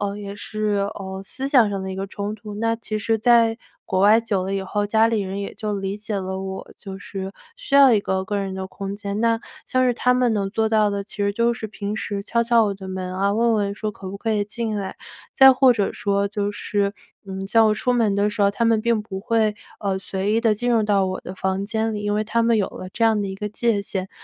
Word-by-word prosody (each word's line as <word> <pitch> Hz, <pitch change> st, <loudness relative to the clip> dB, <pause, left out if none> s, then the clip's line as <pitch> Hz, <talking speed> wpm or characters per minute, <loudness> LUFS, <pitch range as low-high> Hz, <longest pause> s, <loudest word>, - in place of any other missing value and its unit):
呃， 200 Hz, 0 st, -2 dB
也 200 Hz, -1 st, -6 dB
是， 205 Hz, -1 st, -1 dB
呃， 190 Hz, 0 st, -6 dB
思 265 Hz, +6 st, -5 dB
想 245 Hz, -7 st, +5 dB
上 195 Hz, -1 st, -3 dB
的 190 Hz, 0 st, -4 dB
一 -, -, -6 dB
个 195 Hz, +1 st, -3 dB
冲 205 Hz, +1 st, -4 dB
突。 210 Hz, -1 st, -9 dB
那 225 Hz, +2 st, 0 dB
其 215 Hz, -2 st, -4 dB
实 225 Hz, +1 st, 0 dB
在 230 Hz, 0 st, +4 dB, 0.3 s
国 185 Hz, -3 st, 0 dB
外 210 Hz, +3 st, +6 dB
久 205 Hz, -5 st, -1 dB
了 195 Hz, +1 st, -2 dB
以 195 Hz, -, -1 dB
后， 205 Hz, +2 st, -1 dB
家 220 Hz, +2 st, +4 dB
里 225 Hz, -2 st, +1 dB
人 195 Hz, 0 st, -4 dB
也 -, -, -5 dB
就 210 Hz, 0 st, -3 dB
理 195 Hz, +1 st, -3 dB
解 210 Hz, -1 st, -4 dB
了 190 Hz, 0 st, -4 dB
我 190 Hz, 0 st, -6 dB
就 195 Hz, -1 st, -8 dB
是 195 Hz, -1 st, -6 dB, 0.3 s
需 -, -, -4 dB
要 275 Hz, -3 st, +8 dB
一 210 Hz, -, +4 dB
个 190 Hz, -1 st, -1 dB
个 205 Hz, +1 st, -2 dB
人 195 Hz, -1 st, -3 dB
的 190 Hz, 0 st, -4 dB
空 195 Hz, +1 st, -6 dB
间， 200 Hz, 0 st, -4 dB
那 230 Hz, 0 st, +2 dB, 0.3 s
像 255 Hz, 0 st, +2 dB
是 245 Hz, -, +3 dB
他 250 Hz, +1 st, +2 dB
们 250 Hz, -2 st, +2 dB
能 200 Hz, -2 st, 0 dB
做 220 Hz, +2 st, +1 dB
到 215 Hz, -1 st, +4 dB
的， 200 Hz, 0 st, -3 dB
其 -, -, -9 dB
实 200 Hz, 0 st, +1 dB
就 235 Hz, +1 st, +2 dB
是 225 Hz, -2 st, -5 dB
平 205 Hz, 0 st, -5 dB
时 200 Hz, -2 st, -3 dB
敲 235 Hz, +2 st, +1 dB
敲 235 Hz, -1 st, +4 dB
我 205 Hz, -, 0 dB
的 190 Hz, -1 st, -9 dB
门 185 Hz, -1 st, -4 dB
啊， 200 Hz, +1 st, +1 dB
问 230 Hz, +1 st, +3 dB
问 200 Hz, -1 st, 0 dB
说 215 Hz, 0 st, -3 dB
可 190 Hz, -, -9 dB
不 200 Hz, -, -6 dB
可 225 Hz, 0 st, -1 dB
以 210 Hz, -1 st, +1 dB
进 220 Hz, +1 st, -3 dB
来。 190 Hz, -1 st, -5 dB, 0.4 s
再 265 Hz, 0 st, +9 dB
或 260 Hz, -1 st, +5 dB
者 205 Hz, -4 st, -1 dB
说 200 Hz, -3 st, 0 dB
就 205 Hz, -1 st, -2 dB
是， 205 Hz, -1 st, -1 dB, 0.3 s
嗯， 195 Hz, 0 st, -5 dB
在 225 Hz, +2 st, +4 dB
我 215 Hz, -1 st, +4 dB
出 250 Hz, +3 st, 0 dB
门 225 Hz, -4 st, +2 dB
的 205 Hz, +1 st, +2 dB
时 210 Hz, -, -4 dB
候 200 Hz, -, +5 dB
他 230 Hz, +3 st, -1 dB
们 225 Hz, -1 st, +3 dB
并 230 Hz, -2 st, +1 dB
不 190 Hz, -2 st, -6 dB
会， 220 Hz, 0 st, +1 dB, 0.3 s
呃， 195 Hz, -2 st, -1 dB
随 195 Hz, +2 st, -2 dB
意 225 Hz, -, +2 dB
地 225 Hz, -2 st, +3 dB
进 245 Hz, +3 st, -1 dB
入 230 Hz, -2 st, +3 dB
到 200 Hz, -2 st, +2 dB
我 185 Hz, -, -3 dB
的 185 Hz, -, -8 dB
房 190 Hz, +1 st, -2 dB
间 220 Hz, +1 st, -1 dB
里， 205 Hz, -, -4 dB
因 205 Hz, 0 st, 0 dB
为 215 Hz, -, +1 dB
他 230 Hz, +2 st, +1 dB
们 230 Hz, -1 st, +3 dB
有 200 Hz, -3 st, +1 dB
了 185 Hz, -, -8 dB
这 230 Hz, -, +1 dB
样 220 Hz, -2 st, +3 dB
的 -, -, -2 dB
一 190 Hz, -, -5 dB
个 210 Hz, +2 st, -4 dB
界 215 Hz, -1 st, 0 dB
限， 190 Hz, -1 st, -4 dB
205 Hz, 285 characters per minute, -22 LUFS, 195-225 Hz, 0.4 s, 再